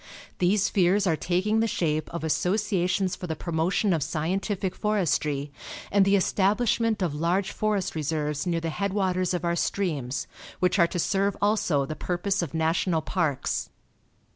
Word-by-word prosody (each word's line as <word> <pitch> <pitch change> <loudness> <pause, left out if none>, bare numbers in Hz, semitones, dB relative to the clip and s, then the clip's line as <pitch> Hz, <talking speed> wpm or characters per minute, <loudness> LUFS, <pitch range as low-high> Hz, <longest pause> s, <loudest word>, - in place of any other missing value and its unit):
These 195 +2 +3
fears 195 +2 +2
are 165 -4 +2
taking 185 +7 0
the 225 - +2
shape 155 -6 -1
of 170 -1 -5
associations 185 +2 0
for 180 - -7
the 160 - -2
promotion 170 +5 0
of 160 - 0
scientific 185 +5 -1
forestry, 150 -9 0 0.4
and 200 -1 +4
the 195 +1 +4
establishment 210 +2 +1
of 170 -5 -1
large 175 +6 0
forest 210 -3 -1
reserves 150 0 -2
near 170 -1 0
the 165 - -2
headwaters 185 -1 0
of 175 0 -3
our 170 0 +1
streams, 140 -10 -1 0.3
which 180 +2 +2
are 170 - +6
to 175 - -5
serve 195 +3 +1
also 200 -9 +2
the 155 - -5
purpose 185 +4 -1
of 165 -2 -4
national 160 +1 +1
parks. 150 -7 -1
180 Hz, 155 wpm, -26 LUFS, 160-200 Hz, 0.4 s, are